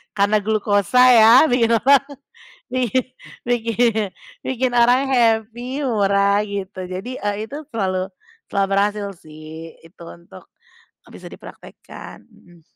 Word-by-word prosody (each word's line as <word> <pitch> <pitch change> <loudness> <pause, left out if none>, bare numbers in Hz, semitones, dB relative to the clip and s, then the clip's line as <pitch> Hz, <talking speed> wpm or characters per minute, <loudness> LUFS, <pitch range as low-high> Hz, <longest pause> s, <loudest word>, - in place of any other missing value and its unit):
karena 205 +1 +2
glukosa 215 +2 +2
ya 225 0 +7 0.2
bikin 235 -2 +2
orang 275 +4 +4 0.7
i 255 -3 0 0.6
bikin 230 -3 0 0.3
bikin 255 -1 -2
orang 245 +3 +3
happy, 240 +3 0
murah 200 -3 +1
gitu. 200 -2 -6
Jadi 205 +8 -7 0.2
itu, 275 +7 -7
eee, 300 - -20
selalu 190 -5 -3 0.4
selalu 195 -1 -1
berhasil 205 0 0 0.2
sih 155 +1 -11
itu 165 +1 -17
untuk, 170 - -14 0.6
bisa - - -14
dipraktekkan. - - -13
Mhm. 175 -2 -22
215 Hz, 115 wpm, -20 LUFS, 195-245 Hz, 0.7 s, ya